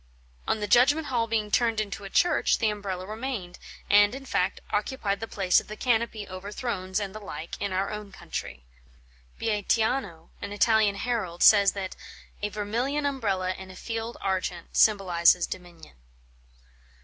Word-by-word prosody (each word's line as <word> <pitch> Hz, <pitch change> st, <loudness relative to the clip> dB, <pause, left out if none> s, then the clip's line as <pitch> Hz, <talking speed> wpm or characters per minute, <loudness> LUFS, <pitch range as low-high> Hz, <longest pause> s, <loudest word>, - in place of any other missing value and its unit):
On 220 Hz, -, +1 dB
the 210 Hz, -, -1 dB
judgment 285 Hz, +8 st, +4 dB
hall 230 Hz, -1 st, +1 dB
being 215 Hz, -2 st, -1 dB
turned 230 Hz, -1 st, +2 dB
into 205 Hz, -1 st, -4 dB
a -, -, -7 dB
church, 350 Hz, -, +3 dB
the 220 Hz, -2 st, +1 dB
Umbrella 195 Hz, -3 st, -5 dB
remained, 215 Hz, -4 st, -5 dB, 0.3 s
and 205 Hz, +3 st, +5 dB
in 270 Hz, 0 st, -8 dB
fact 185 Hz, -6 st, 0 dB
occupied 205 Hz, -2 st, -1 dB
the 225 Hz, -, -5 dB
place 190 Hz, -4 st, +3 dB
of -, -, -18 dB
the 215 Hz, -, -7 dB
canopy 225 Hz, -4 st, 0 dB
over 185 Hz, +2 st, -7 dB
thrones 200 Hz, -5 st, -2 dB
and 200 Hz, -2 st, -4 dB
the 215 Hz, -, -7 dB
like 165 Hz, -5 st, -7 dB
in 200 Hz, -, -1 dB
our 190 Hz, +1 st, -1 dB
own 210 Hz, -1 st, -7 dB
country. 65 Hz, -, -7 dB, 0.7 s
Beatiano, 210 Hz, -4 st, 0 dB
an 200 Hz, -, -5 dB
Italian 215 Hz, -1 st, +3 dB
herald, 200 Hz, -7 st, -2 dB
says 200 Hz, -2 st, +7 dB
that 190 Hz, -2 st, -5 dB, 0.5 s
"a 210 Hz, -, -1 dB
vermilion 235 Hz, +8 st, -2 dB
Umbrella 200 Hz, -10 st, 0 dB
in 190 Hz, 0 st, -10 dB
a 185 Hz, -, -11 dB
field 225 Hz, +3 st, -5 dB
argent 185 Hz, -2 st, -3 dB
symbolises 180 Hz, -4 st, +4 dB
dominion." 170 Hz, -, -10 dB
205 Hz, 160 wpm, -27 LUFS, 185-225 Hz, 0.7 s, says